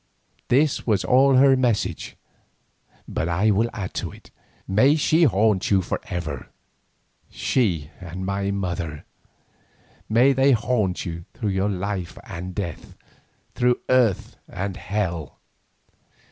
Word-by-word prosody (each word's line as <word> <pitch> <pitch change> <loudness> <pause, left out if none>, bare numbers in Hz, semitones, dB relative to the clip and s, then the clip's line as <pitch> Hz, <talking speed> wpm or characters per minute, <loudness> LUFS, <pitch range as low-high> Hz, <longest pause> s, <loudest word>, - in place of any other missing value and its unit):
This 140 +2 +2
was 105 -4 +1
all 135 +1 +5
her 135 +1 +6
message, 125 -5 -1 0.9
but 80 - -2
I 100 +6 +2
will 110 +4 +2
add 95 -4 -5
to - - -4
it. - - -16 0.4
May 130 +10 +4
she 160 +2 +3
haunt 105 -4 +2
you 95 -2 +3
for - - -3
ever, 80 -6 -5 0.8
she 85 - 0
and 95 +1 -6
my 100 +1 -1
mother; 85 -6 -3 1.0
may 120 +5 +5
they 135 +1 +4
haunt 110 -5 0
you 85 -1 -6
through 100 -3 -1
life 95 -2 -3
and 90 +2 -7
death, 85 -6 -6 0.6
through 125 0 +2
earth 115 -3 +2
and 95 0 -4
hell." 95 -6 -3
100 Hz, 120 wpm, -23 LUFS, 90-125 Hz, 1.0 s, her